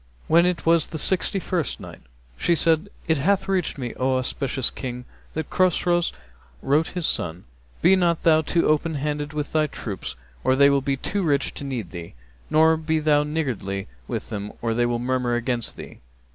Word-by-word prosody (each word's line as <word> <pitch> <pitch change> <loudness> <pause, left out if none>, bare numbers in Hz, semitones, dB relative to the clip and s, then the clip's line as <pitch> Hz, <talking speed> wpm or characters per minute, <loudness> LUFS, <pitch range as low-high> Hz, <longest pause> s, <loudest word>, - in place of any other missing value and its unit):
When 170 +2 +5
it 180 -1 -1
was 165 -1 +4
the 160 - -6
Sixty 190 +4 +1
first 180 -4 -2
night, - - -10 0.3
She 170 - +2
said, 165 +4 +2 0.2
It 160 -2 +2
hath 195 +6 +2
reached 190 -6 0
me, 125 -3 -4
O 130 0 +2
auspicious 130 0 -1
King, 125 -1 -6 0.3
that 160 -1 -4
Chosroës 175 -1 +2 0.5
wrote 150 +4 +2
his 180 -3 -3
son, 85 - -1 0.4
'Be 185 +3 +7
not 170 -3 +1
thou 160 -1 +5
too 165 +2 +1
open 155 +1 +1
handed 145 0 -2
with 150 -1 -4
thy 155 -1 +2
troops, 105 - -6 0.3
or 130 - +3
they 140 +1 +6
will 140 -1 +2
be 135 0 -1
too 200 +8 -2
rich 145 -5 +1
to - - -6
need 125 -9 -4
thee; 85 -5 -8 0.3
nor 160 +1 +5
be 160 0 0
thou 150 -1 +3
niggardly 130 -11 -2 0.2
with - - -4
them, 105 0 -5
or 115 -1 -1
they 120 +1 +2
will 120 0 0
murmur 125 0 0
against 120 -1 -2
thee. - - -10
150 Hz, 185 wpm, -24 LUFS, 125-165 Hz, 0.5 s, Be